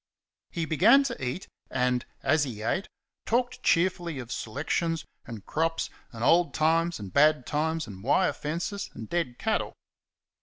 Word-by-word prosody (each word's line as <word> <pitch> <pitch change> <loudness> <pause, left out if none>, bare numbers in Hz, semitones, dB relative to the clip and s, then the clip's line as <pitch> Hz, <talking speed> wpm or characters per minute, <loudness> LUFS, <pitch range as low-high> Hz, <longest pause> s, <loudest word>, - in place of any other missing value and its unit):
He 165 -1 -2
began 210 - +6
to 240 - -4
eat 130 +9 -3 0.2
and, 125 -1 0 0.2
as 155 -1 +3
he 115 -6 -5
ate, 190 - -1 0.4
talked 245 +2 0
cheerfully 170 -2 +1
of 125 -2 -7
selections 160 +7 -2 0.2
and 115 -4 -8
crops 165 +1 -1 0.2
and 115 -1 -6
old 170 +5 +4
times 165 +1 +2
and 100 -3 -8
bad 150 -2 +4
times 160 +2 -1
and 95 -2 -10
wire 180 +9 +3
fences 170 +7 -4
and 110 - -7
dead 145 -7 -2
cattle. 220 -1 -1
160 Hz, 150 wpm, -28 LUFS, 125-175 Hz, 0.4 s, began